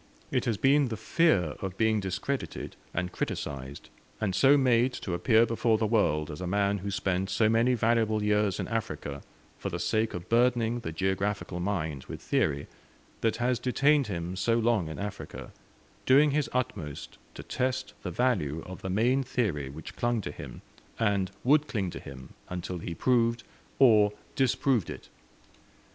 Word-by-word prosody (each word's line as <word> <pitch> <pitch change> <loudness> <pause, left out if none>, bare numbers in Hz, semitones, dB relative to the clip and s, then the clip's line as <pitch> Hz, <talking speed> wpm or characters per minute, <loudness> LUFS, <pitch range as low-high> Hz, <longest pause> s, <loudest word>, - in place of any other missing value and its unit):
It - - 0
has 115 -3 0
been 140 +3 +4
the 110 -2 -4
fear 110 - +2
of 95 -1 -5
being 110 -1 +2
discredited 100 +8 -4 0.2
and 90 0 -2
criticised 70 0 -5 0.3
and 100 -3 -1
so 135 +8 +5
made 125 -1 +3
to 95 - -4
appear 110 +6 +4
before 115 -1 +1
the 110 - 0
world 85 -8 +1
as 75 - -7
a 90 - -3
man 100 +1 +1
who 100 +2 -4
spent 95 -1 -1
so 110 - +3
many 115 +3 +3
valuable 110 -2 +2
years 105 -2 +1
in - - -2
Africa 110 -11 -4 0.4
for - - -3
the - - -3
sake 110 -2 0
of 90 0 -7
burdening 120 0 +2
the 115 - -5
geographical 95 +1 -1
mind 80 -7 -2
with - - -7
theory 70 0 0 0.5
that 115 -1 +1
has 120 +1 0
detained 140 +2 +3
him 85 -2 -4
so 115 +5 +1
long 115 -7 +2
in 80 - -6
Africa, 105 0 -6 0.6
doing 145 +3 +6
his 150 0 0
utmost 100 - -4 0.2
to - - -8
test 130 -4 -2
the 90 - -4
value 85 - 0
of 95 0 -9
the 95 - -4
main 120 +8 +2
theory 100 - -1
which 75 +3 -9
clung 120 -1 0
to - - -5
him, - - -10 0.3
and 100 -4 +1
would 150 +3 +4
cling 95 -6 -2
to - - -7
him 65 -1 -11 0.2
until 90 0 -4
he 85 +1 -5
proved 115 +3 +2 0.3
or 105 -6 +6 0.2
disproved 130 -4 +1
it. - - -8
105 Hz, 170 wpm, -28 LUFS, 90-120 Hz, 0.6 s, doing